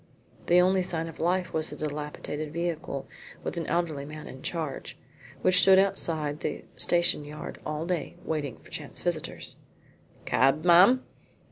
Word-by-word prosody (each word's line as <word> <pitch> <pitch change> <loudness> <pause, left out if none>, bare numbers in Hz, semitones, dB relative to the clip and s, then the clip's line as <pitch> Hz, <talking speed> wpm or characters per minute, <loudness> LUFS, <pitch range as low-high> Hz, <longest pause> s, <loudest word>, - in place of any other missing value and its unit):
The 175 +1 +6
only 185 +1 +4
sign 165 -3 -2
of 165 - -10
life 180 +2 0
was 160 0 0
a - - -6
dilapidated 150 0 -4
vehicle 165 -4 -3 0.4
with - - -3
an 170 -2 -3
elderly 165 -5 0
man 150 +1 -8
in 130 - -10
charge, 160 -4 -4 0.5
which 185 0 +5
stood 190 -1 +7
outside 160 -6 +1
the - - -4
station 175 -3 +2
yard 150 +1 -8
all 155 +1 -2
day 180 -2 -2
waiting 150 -5 -2
for - - -18
chance - - -6
visitors. - - -3 0.7
"Cab, 135 +5 +3
ma'am?" 185 +9 +7
160 Hz, 150 wpm, -28 LUFS, 150-175 Hz, 0.7 s, stood